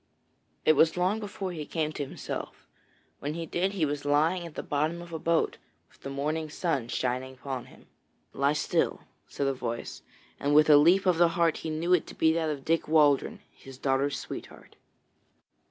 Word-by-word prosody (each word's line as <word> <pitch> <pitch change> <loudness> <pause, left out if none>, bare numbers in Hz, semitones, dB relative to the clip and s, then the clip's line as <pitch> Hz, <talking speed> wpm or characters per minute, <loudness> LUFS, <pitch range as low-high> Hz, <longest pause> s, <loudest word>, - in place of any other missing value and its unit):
It 155 - +6
was 160 +3 +3
long 185 +5 +1
before 200 -3 -5
he 160 -3 -5
came 155 0 -2
to 145 - -3
himself. 135 - -7 0.5
When 145 +2 -4
he 165 0 -4
did, 185 +4 -1
he 180 -6 +1
was 145 -1 -3
lying 160 +5 +2
at 160 - -13
the - - -4
bottom 155 +4 -1
of 170 -1 -10
a 160 - -3
boat, 165 +1 +1 0.3
with - - -25
the 135 - -6
morning 155 +3 -2
sun 145 -6 -1
shining 130 +2 -2
upon 130 -1 -5
him. - - -18 0.5
'Lie 140 +1 +2
still,' 150 - 0 0.3
said 140 - -3
a 135 - +1
voice, 120 -2 -5 0.4
and 145 +1 +1
with 155 0 +6
a 145 - +9
leap 175 +7 +5
of 180 -3 +3
the 175 - +7
heart 165 -2 +3
he 160 - -5
knew 165 +3 0
it 180 - +2
to - - -10
be 160 0 +3
that 160 -1 0
of 140 -3 -4
Dick 165 +1 +1
Waldron, 155 +7 +3
his 135 -1 -13
daughter's 135 +1 0
sweetheart. - - -9
155 Hz, 195 wpm, -28 LUFS, 140-170 Hz, 0.5 s, a